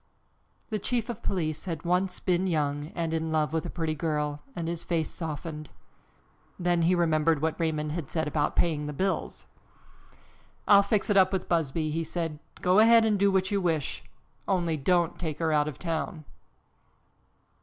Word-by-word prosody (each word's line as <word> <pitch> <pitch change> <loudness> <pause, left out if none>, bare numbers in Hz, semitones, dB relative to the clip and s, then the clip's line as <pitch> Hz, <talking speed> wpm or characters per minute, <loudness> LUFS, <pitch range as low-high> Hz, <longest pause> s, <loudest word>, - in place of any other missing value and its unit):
The 215 - -1
chief 235 +2 -1
of 235 - -5
police 155 -4 -2
had 165 -4 -5
once 180 +1 0
been 185 0 +1
young 145 -3 -1
and 165 -1 -2
in 160 0 -1
love 155 -1 +1
with 160 - -1
a - - -5
pretty 160 -2 -2
girl 150 -2 -2
and 165 -1 -3
his 170 0 -3
face 165 -2 -1
softened. 155 -2 -6 0.9
Then 175 -1 +1
he 175 +2 +3
remembered 160 -2 +2
what 160 +2 -1
Raymond 155 -2 -1
had 155 -3 -4
said 160 -2 -1
about 150 0 0
paying 150 -3 +1
the 150 - -4
bills. 190 +6 -2 1.2
"I'll 200 -1 +8
fix 200 +1 0
it 200 - +4
up 185 -1 +5
with 190 -2 -2
Busby," 155 -2 0
he 165 +2 -1
said. 165 -2 -3 0.2
"Go 185 +3 +4
ahead 225 +1 +7
and 210 -2 +2
do 200 0 +4
what 190 0 +1
you 200 -1 +1
wish, 160 -6 -1 0.4
only 175 -4 +1
don't 170 +3 +1
take 155 -4 -3
her 160 -1 0
out 150 0 +3
of 150 - -5
town." 165 -1 -3
165 Hz, 175 wpm, -28 LUFS, 155-185 Hz, 1.2 s, I'll